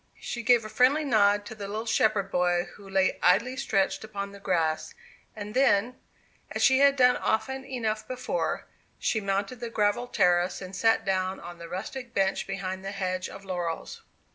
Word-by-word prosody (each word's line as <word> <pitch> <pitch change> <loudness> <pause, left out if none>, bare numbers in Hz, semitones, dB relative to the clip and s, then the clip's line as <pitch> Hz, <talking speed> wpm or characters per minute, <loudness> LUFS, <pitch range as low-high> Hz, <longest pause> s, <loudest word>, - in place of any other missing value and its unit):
She 240 - -5
gave 235 -1 +4
a - - -4
friendly 260 +7 +3
nod 205 -6 +3
to 220 - -7
the 205 -2 -7
little 215 +3 -4
shepherd 215 -3 +1
boy 175 -1 +2
who 200 -1 -14
lay 190 -1 +1
idly 240 +8 +3
stretched 195 -6 0
upon 200 -2 -5
the 200 - -12
grass. 165 -5 -1 0.4
And 210 -1 -7
then, 250 -2 +2 0.5
as - - -2
she 265 0 +5
had 280 0 +5
done 250 -2 +5
often 265 +5 -1
enough 220 -5 -3
before, 255 - -2 0.3
she 220 - 0
mounted 200 +4 -2
the 240 -1 -5
gravelled 230 +3 0
terrace, 180 0 +3
and 185 0 -8
sat 225 +3 +2
down 190 -1 -1
on 175 0 -10
a 170 - -7
rustic 235 +7 -6
bench 195 0 +1
behind 190 -1 -4
the 195 - -4
hedge 185 -2 -3
of 195 - -11
laurels. 175 -3 -4
205 Hz, 180 wpm, -27 LUFS, 190-240 Hz, 0.5 s, she